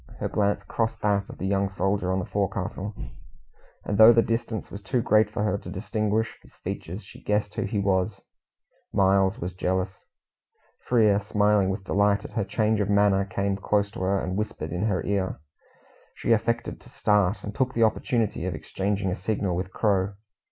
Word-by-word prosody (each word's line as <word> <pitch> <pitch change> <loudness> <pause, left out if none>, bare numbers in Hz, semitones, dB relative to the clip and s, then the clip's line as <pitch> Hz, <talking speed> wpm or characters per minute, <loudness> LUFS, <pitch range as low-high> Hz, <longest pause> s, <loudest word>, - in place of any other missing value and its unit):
Her - - -2
glance 100 -1 0
crossed 115 -1 -2
that 100 -1 +1
of - - -9
the - - -4
young 100 0 +1
soldier 95 -1 0
on 95 - +1
the 95 - -2
forecastle, 100 0 -3 0.9
and 100 0 -1
though 110 +1 +10
the 115 0 +4
distance 115 -1 -3
was 100 - -7
too 110 +5 0
great 110 -2 +3
for 105 -1 -2
her 100 -1 0
to 90 - -9
distinguish 105 +3 -1
his - - -21
features, 95 +6 -6
she 100 - -14
guessed 105 0 0
who - - -2
he 105 - -2
was 95 -2 +1 0.7
Miles 95 0 +3
was 90 +2 -4
jealous. 95 +1 -2 0.8
Frere, 110 -5 +3
smiling 105 -1 +2
with 95 +1 -3
delight 100 +1 +2
at - - -8
her 110 - -1
change 110 +2 +1
of 100 -1 0
manner, 100 -1 +3
came 100 +1 -1
close 100 0 0
to - - -8
her, 95 +2 +1
and 95 0 -3
whispered 105 -7 -3
in 90 +4 -1
her 100 -4 -1
ear. 95 -2 -1 0.8
She - - -1
affected 115 +1 0
to - - -16
start, 105 -1 +1
and 105 - -5
took 130 +1 -1
the 115 - +3
opportunity 110 -4 0
of 90 - -2
exchanging 95 +3 -2
a - - -1
signal 95 -2 -1
with 90 +1 -2
the 95 - -25
Crow. 100 -2 +1
100 Hz, 190 wpm, -26 LUFS, 95-105 Hz, 0.9 s, though